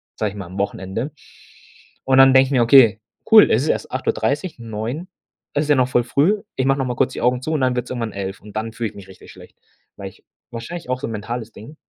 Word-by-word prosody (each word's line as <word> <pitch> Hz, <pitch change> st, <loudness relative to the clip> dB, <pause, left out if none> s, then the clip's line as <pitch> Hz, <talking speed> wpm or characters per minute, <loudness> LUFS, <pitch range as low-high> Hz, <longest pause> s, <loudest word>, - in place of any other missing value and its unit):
sage 105 Hz, -2 st, -2 dB
ich -, -, -13 dB
mal 100 Hz, -, -6 dB
am 95 Hz, +3 st, -9 dB
Wochenende. 100 Hz, +6 st, -3 dB, 0.9 s
Und 130 Hz, 0 st, +3 dB
dann 135 Hz, 0 st, +7 dB
denke 130 Hz, 0 st, +6 dB
ich -, -, -8 dB
mir: 130 Hz, -3 st, +3 dB
„Okay, 115 Hz, -3 st, +6 dB, 0.3 s
cool, 220 Hz, -2 st, +8 dB
es -, -, +2 dB
ist 155 Hz, -, -2 dB
erst -, -, -2 dB
8:30, 140 Hz, +4 st, -2 dB
9. 115 Hz, -, -5 dB, 0.5 s
Es 145 Hz, -, +1 dB
ist -, -, -9 dB
ja 150 Hz, -, +5 dB
noch 130 Hz, -1 st, +2 dB
voll 120 Hz, -1 st, +2 dB
früh. 175 Hz, -, +1 dB
Ich 130 Hz, -, -1 dB
mache 135 Hz, +1 st, +2 dB
nochmal 125 Hz, -2 st, -2 dB
kurz 135 Hz, -, +1 dB
die -, -, -6 dB
Augen 125 Hz, +1 st, +1 dB
zu.‟ 155 Hz, +5 st, -3 dB
Und 150 Hz, -, 0 dB
dann 125 Hz, -1 st, +1 dB
wird 125 Hz, -1 st, -2 dB
es -, -, -9 dB
irgendwann 115 Hz, -4 st, -3 dB
11, 95 Hz, -1 st, -6 dB
und 105 Hz, 0 st, -14 dB
dann 110 Hz, +1 st, -4 dB
fühle 115 Hz, -1 st, -3 dB
ich 105 Hz, -, -20 dB
mich 100 Hz, -2 st, -12 dB
richtig 95 Hz, -, -14 dB
schlecht. -, -, -16 dB, 0.4 s
Weil 100 Hz, -1 st, -7 dB
ich -, -, -23 dB, 0.3 s
wahrscheinlich 125 Hz, +7 st, -7 dB
auch 130 Hz, 0 st, -1 dB
so 145 Hz, -, -3 dB
'n -, -, -6 dB
mentales 115 Hz, +2 st, -5 dB
Ding. 115 Hz, +9 st, -12 dB
125 Hz, 260 wpm, -20 LUFS, 110-135 Hz, 0.9 s, cool